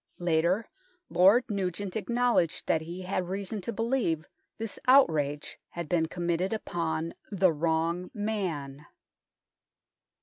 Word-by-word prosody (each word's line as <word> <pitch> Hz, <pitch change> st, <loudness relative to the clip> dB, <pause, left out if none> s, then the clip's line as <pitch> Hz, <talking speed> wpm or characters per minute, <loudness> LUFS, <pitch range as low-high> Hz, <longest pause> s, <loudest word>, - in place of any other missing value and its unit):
Later 175 Hz, +5 st, +1 dB, 0.4 s
Lord 195 Hz, +7 st, +6 dB
Nugent 195 Hz, -2 st, -3 dB
acknowledged 235 Hz, -6 st, +1 dB
that 160 Hz, -, +2 dB
he 170 Hz, +3 st, -7 dB
had 185 Hz, -1 st, -2 dB
reason 200 Hz, +2 st, -3 dB
to 210 Hz, -, -3 dB
believe 225 Hz, -10 st, 0 dB, 0.3 s
this 225 Hz, -2 st, -5 dB
outrage 155 Hz, -, +3 dB
had 170 Hz, -2 st, -5 dB
been 160 Hz, 0 st, +1 dB
committed 175 Hz, +3 st, -1 dB
upon 165 Hz, -5 st, -2 dB, 0.2 s
the 185 Hz, -4 st, +3 dB
wrong 165 Hz, +3 st, 0 dB
man. 170 Hz, -10 st, -3 dB
180 Hz, 110 wpm, -29 LUFS, 165-205 Hz, 0.4 s, Lord